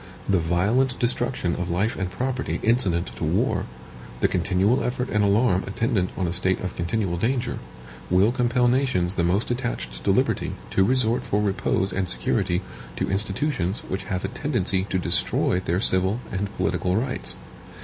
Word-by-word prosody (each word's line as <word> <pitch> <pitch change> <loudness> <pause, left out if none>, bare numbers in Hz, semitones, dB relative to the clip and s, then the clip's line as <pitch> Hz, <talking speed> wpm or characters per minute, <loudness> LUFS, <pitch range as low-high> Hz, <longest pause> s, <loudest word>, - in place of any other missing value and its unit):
The 95 -2 +3
violent 105 +11 +1
destruction 120 -6 0
of 90 0 -3
life 100 +7 0
and 95 -1 -2
property 125 +7 -2
incident 100 -8 +2
to - - -5
war, - - 0 0.5
the - - +3
continual 100 +7 +1
effort 125 +1 -2
and 105 -1 +2
alarm 100 -1 +3
attendant 100 -2 0
on 95 - 0
a 85 - -1
state 95 +1 +1
of 90 - -4
continual 85 +1 -1
danger, 120 +5 -1 0.5
will 95 +5 +4
compel 125 0 +2
nations 120 -9 +1
the 85 - 0
most 95 +8 +1
attached 120 0 -4
to - - 0
liberty - - +1 0.2
to 95 - +3
resort 120 +1 +2
for 105 - 0
repose 95 -2 0
and 95 -1 -1
security 90 +1 0 0.3
to - - -2
institutions 100 - -1
which 95 - -3
have 95 -3 -3
a - - -2
tendency 95 0 -1
to 95 - -1
destroy 90 0 +2
their 90 -1 -1
civil 95 +2 +2
and 100 +1 -2
political 90 0 0
rights. 125 +5 -1
100 Hz, 165 wpm, -24 LUFS, 90-120 Hz, 0.5 s, will